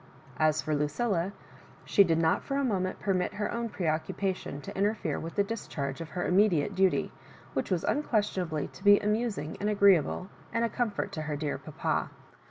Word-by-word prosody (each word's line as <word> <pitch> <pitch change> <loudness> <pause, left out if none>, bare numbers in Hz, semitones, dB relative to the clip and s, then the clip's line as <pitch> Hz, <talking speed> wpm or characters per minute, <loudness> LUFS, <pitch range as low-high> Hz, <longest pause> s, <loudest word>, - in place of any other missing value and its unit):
As 155 0 +3
for 155 - -1
Lucilla, 170 +6 0 0.5
she 200 - +6
did 165 -4 +2
not 165 -1 +2
for 275 - -2
a 280 - +1
moment 185 -7 -1
permit 185 -3 0
her 210 0 -2
own 235 0 -2
pre 185 - -4
occnpation 160 0 -2
to - - -8
inter 205 +3 +2
fere 160 -8 -3
with 165 +1 -6
the 200 - +3
discharge 165 -10 -4
of 165 - -6
her 175 +2 -3
immediate 190 -2 +3
duty, 190 -1 +2 0.4
which - - -1
was 180 -4 0
unquestionably 200 - 0
to 190 - -15
be 205 0 +7
amusing 210 -7 -1
apd 205 - +1
agreeable, 195 -4 +4 0.2
and 230 0 +1
a - - -1
comfort 225 -4 -2
to 155 - -4
her 150 -1 -3
dear 145 0 -2
papa. - - -2
190 Hz, 185 wpm, -29 LUFS, 160-210 Hz, 0.5 s, be